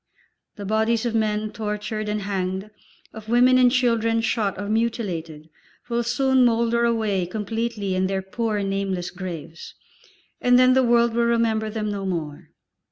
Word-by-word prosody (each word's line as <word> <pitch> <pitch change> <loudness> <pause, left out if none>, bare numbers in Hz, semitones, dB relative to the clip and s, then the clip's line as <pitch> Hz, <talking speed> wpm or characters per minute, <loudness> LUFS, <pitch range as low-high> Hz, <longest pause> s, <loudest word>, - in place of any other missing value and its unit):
The 205 - -7
bodies 220 +3 +1
of 235 - -1
men 215 -1 0
tortured 210 0 -4
and 210 -1 -2
hanged, 190 +1 -3 0.4
of 220 -1 -10
women 250 +2 +5
and 250 -1 +5
children 230 -3 +2
shot 210 -5 -1
or 205 - -4
mutilated, 190 -9 -2 0.4
will 235 0 0
soon 265 +2 +2
moulder 235 0 +2
away 215 -6 0
completely 220 0 -3
in 185 0 +1
their 190 0 -2
poor, 210 +1 -2
nameless 195 -2 -2
graves, 170 -3 -8 0.7
and 245 0 +5
then 255 0 +6
the 260 - +4
world 235 -1 +3
will 235 0 +2
remember 225 -2 +1
them 215 -1 -3
no 195 -1 -4
more. 155 -5 -5
220 Hz, 155 wpm, -23 LUFS, 195-235 Hz, 0.7 s, then